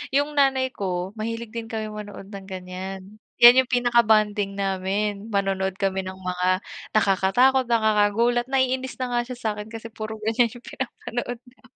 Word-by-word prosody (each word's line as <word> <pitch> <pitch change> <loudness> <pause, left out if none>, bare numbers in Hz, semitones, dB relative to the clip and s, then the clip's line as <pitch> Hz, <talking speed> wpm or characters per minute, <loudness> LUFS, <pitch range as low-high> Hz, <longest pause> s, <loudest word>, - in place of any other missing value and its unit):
yung 290 +1 +2
nanay 270 -2 +2
ko 185 -3 -3
mahilig 230 0 -4
din 230 -1 -5
kami 220 -2 -4
manood 205 -1 -9
ng 195 -1 -9
ganiyan. 190 +2 -7 0.2
Yan 245 +2 +10
yung 260 - +2
pinaka-bonding 220 -5 +2
namin. 200 +2 -2
Manonood 195 -2 -1
kami 190 -1 -1
ng 190 - -6
mga 185 +1 -1 0.3
nakakatakot, 215 +6 +3
nakakagulat, 230 +2 +2
naiinis 260 -1 0
na 255 -1 -3
nga 240 0 +2
siya 250 - -6
sa'kin 215 -3 -4
kasi 225 0 -9
puro 220 0 -6
ganiyan 230 +1 +1
yung 245 - -12
pinapanood 245 -1 -5
namin. 245 0 -22
215 Hz, 155 wpm, -24 LUFS, 195-245 Hz, 0.3 s, Yan